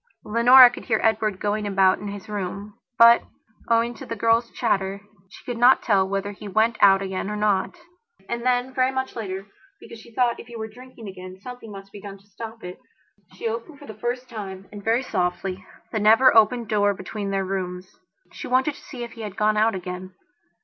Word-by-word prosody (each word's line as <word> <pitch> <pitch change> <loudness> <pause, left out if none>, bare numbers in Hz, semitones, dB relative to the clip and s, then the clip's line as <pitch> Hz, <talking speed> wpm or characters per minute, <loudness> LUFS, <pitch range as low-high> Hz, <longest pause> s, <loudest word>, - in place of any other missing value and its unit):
Leonora 245 +3 +8
could - - -10
hear 220 -3 +1
Edward 215 -3 +1
going 210 0 -1
about 190 -1 +3
in 205 - -7
his 200 -1 -7
room, 205 0 -5 0.2
but, 235 0 +8 0.5
owing 230 +1 +2
to 225 - -11
the 230 - -5
girl's 230 +2 +2
chatter, 195 -4 -1 0.3
she - - -15
could 240 -2 -4
not 245 +2 +5
tell 195 -4 +2
whether 195 +1 -2
he 205 +1 -10
went 220 +4 +2
out 195 -1 +6
again 190 +1 -4
or 210 - -3
not. 210 - 0 0.5
And 235 0 -4
then, 250 +1 0
very 255 0 +2
much 260 0 -3
later, 195 -4 -5 0.3
because 230 - -12
she 235 - -15
thought 240 +1 +1
that - - -8
if - - -16
he 240 - -11
were 220 -1 -5
drinking 245 0 -13
again 185 -1 -9
something 245 -1 -9
must 195 0 -11
be 205 - -11
done 200 -1 -9
to 195 - -25
stop 225 +2 -10
it, 180 0 -8 0.6
she 230 - -4
opened 230 +7 -5
for 290 - -13
the 220 - -9
first 240 +4 -4
time, 195 -5 -8
and 205 -1 -10
very 230 +4 +1
softly, 185 -2 -2 0.3
the 220 - -1
never 225 +5 +5
opened 230 +1 +4
door 205 -1 +2
between 200 +2 -5
their 195 -1 -1
rooms. 185 - -5 0.4
She - - -8
wanted 260 +4 +2
to - - -15
see 250 -4 -8
if 235 - -7
he 230 - -10
had 210 -2 -7
gone 215 0 +2
out 215 0 +2
again. 185 0 -7
215 Hz, 210 wpm, -23 LUFS, 195-235 Hz, 0.6 s, Leonora